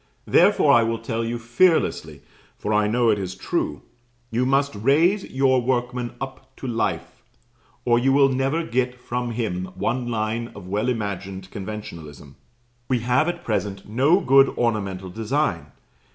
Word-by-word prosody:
Therefore, - - +4
I 120 - +6
will 115 0 0
tell 115 0 -3
you 115 +1 -2
fearlessly, 120 +10 +1 0.3
for 105 - -2
I 105 0 +3
know 115 +1 +3
it 105 - 0
is 95 -1 -4
true, 75 -5 -3 0.5
you 125 +3 +1
must 140 +1 +2
raise 155 - +2
your 130 -1 +2
workman 125 -1 -2
up 135 0 -8
to - - -9
life, 115 0 -2 0.6
or 120 -1 +4
you 135 +2 +2
will 135 0 +5
never 135 +5 0
get 125 +1 -1
from 125 0 -3
him 110 -6 -2
one 120 +6 -1
line 115 +1 -2
of 100 -3 -10
well 105 +6 -1
imagined 95 -4 -4
conventionalism. 85 -9 -8 0.5
We 125 -3 0
have 125 +8 +2
at 175 0 -6
present 100 -1 -2
no 140 - +3
good 135 -1 +5
ornamental 100 -6 -2
design. 110 - -1
120 Hz, 150 wpm, -23 LUFS, 105-130 Hz, 0.6 s, I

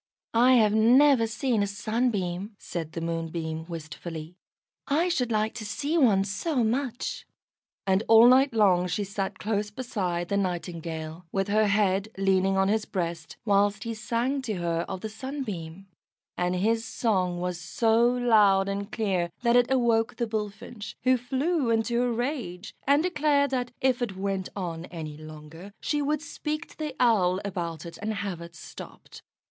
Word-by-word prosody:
"I 245 +3 +5
have 215 -4 +5
never 245 +2 +5
seen 225 0 0
a 200 - +1
Sunbeam," 205 -2 -2
said 165 -5 -6
the 165 - -4
Moonbeam, 165 -1 -3
wistfully. 165 0 -7 0.5
"I 320 +6 +2
should 250 -9 0
like 215 0 +1
to 230 - -6
see 285 +9 -2
one 220 - +4
so 235 - -1
much;" 245 +2 -2 0.6
and 190 0 +3
all 225 +1 +8
night 265 +3 +6
long 190 -5 +3
she 205 +4 -1
sat 195 -1 -4
close 210 0 -1
beside 195 -7 -3
the 200 - +1
Nightingale, 170 -3 -4
with 195 0 -1
her 215 +1 +3
head 200 0 +2
leaning 195 0 +2
on 195 0 +3
his 215 +1 +1
breast 170 -3 -4
whilst 205 0 +2
he 230 -1 -3
sang 235 +5 -1
to 235 -5 -3
her 170 -1 -1
of 185 - -5
the 220 - -3
Sunbeam; 210 - -6 0.5
and 180 0 0
his 225 +5 +1
song 185 -7 0
was 180 0 -3
so 225 +6 +2
loud 220 -6 +4
and 200 +1 -3
clear 190 -6 0
that 235 0 +4
it 245 0 +4
awoke 235 -4 +2
the 235 - -1
Bullfinch, 215 0 -5
who 255 0 +5
flew 265 +3 0
into 230 +1 +1
a 245 -1 +1
rage, 235 - -3
and 285 +3 +4
declared 295 -5 +2
that 250 -2 -1
if 260 -1 +2
it 205 -6 -2
went 195 -1 -2
on 170 -4 -4
any 160 -4 -7
longer 155 +4 -11
she 295 -1 -1
would 300 +1 -1
speak 305 0 -4
to - - -17
the 300 -3 -4
Owl 190 -7 +3
about 175 -4 -4
it, 170 - -9
and 215 +1 -2
have 195 -4 -4
it 170 0 -10
stopped. 155 - -11
210 Hz, 165 wpm, -27 LUFS, 180-245 Hz, 0.6 s, all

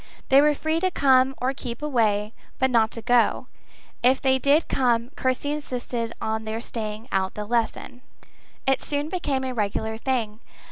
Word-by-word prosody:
They 270 +1 +7
were 300 0 +3
free 315 +2 -1
to 370 +2 +1
come 265 -4 +3
or 255 +2 0
keep 250 0 -6
away, 220 -6 +1 0.2
but 260 0 +1
not 225 -2 +3
to 230 - -6
go: 245 +1 +2 0.6
if 255 +2 +4
they 265 -1 +2
did 285 +4 +3
come, 240 -1 +1
Kirsty 260 +3 -1
insisted 250 -5 -3
on 220 0 -2
their 220 +1 -4
staying 220 -1 -5
out 190 0 0
the 210 - -4
lesson. 235 +2 -2 0.6
It 270 0 +2
soon 290 +1 -2
became 290 -7 -1
a 260 -1 -3
regular 220 0 -2
thing. 230 -4 -2
250 Hz, 170 wpm, -24 LUFS, 225-270 Hz, 0.6 s, They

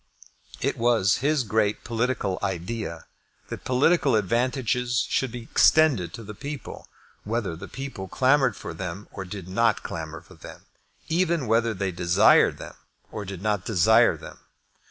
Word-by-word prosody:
It - - -1
was 115 -5 +3
his 145 +2 +1
great 105 -1 0
political 115 -5 -1
idea 90 -1 -4 0.4
that - - -7
political 135 +1 +3
advantages 120 +3 0
should 130 -3 -1
be 120 0 -7
extended 135 - +3
to 115 - -9
the 105 0 -8
people, 140 +5 -8 0.4
whether 105 -5 -2
the 90 +4 -9
people 135 -8 -7
clamoured 130 +1 +2
for 85 - -7
them 90 +3 -6
or 95 - -7
did 95 -1 -8
not 115 +3 +1
clamour 80 0 -6
for - - -18
them, - - -13 0.4
even 170 -3 +1
whether 115 0 +1
they 95 0 -2
desired 90 +4 +4
them - - -10 0.3
or 105 - -6
did 95 -1 -7
not 105 -3 0
desire 110 +3 +4
them. - - -12
110 Hz, 150 wpm, -25 LUFS, 95-125 Hz, 0.4 s, desired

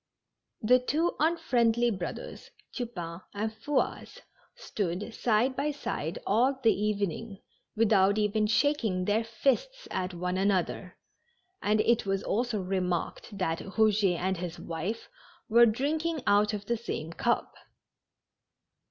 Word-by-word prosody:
The 250 +4 +6
two 310 +7 0
unfriendly 240 -7 +2
brothers, 185 -4 -6 0.2
Tupain 180 -9 -5
and 215 +2 -1
Fouasse, 255 +7 -2 0.4
stood 200 +3 -3
side 240 +4 +1
by 285 +2 0
side 170 - -3
all 255 +6 +2
the 225 - +5
evening, 205 0 -2 0.4
with 220 0 +3
out 195 +1 +4
even 210 0 +1
shaking 215 -5 +1
their 210 +3 +2
fists 280 - -1
at 185 -1 -2
one 180 +1 -2
another, 190 -1 0 0.6
and 210 +1 +2
it 235 -2 +2
was 195 0 0
also 235 0 0
remarked 185 +2 -2
that 165 -4 -1
Eouget 205 -3 +2
and 190 +2 -1
his 175 0 -5
wife 170 +7 -4 0.4
were 235 +1 +6
drinking 305 +6 -1
out 205 +1 +4
of 205 -1 -5
the 235 +3 0
same 165 -8 -5
cup. 235 +6 0
215 Hz, 125 wpm, -29 LUFS, 190-240 Hz, 0.6 s, The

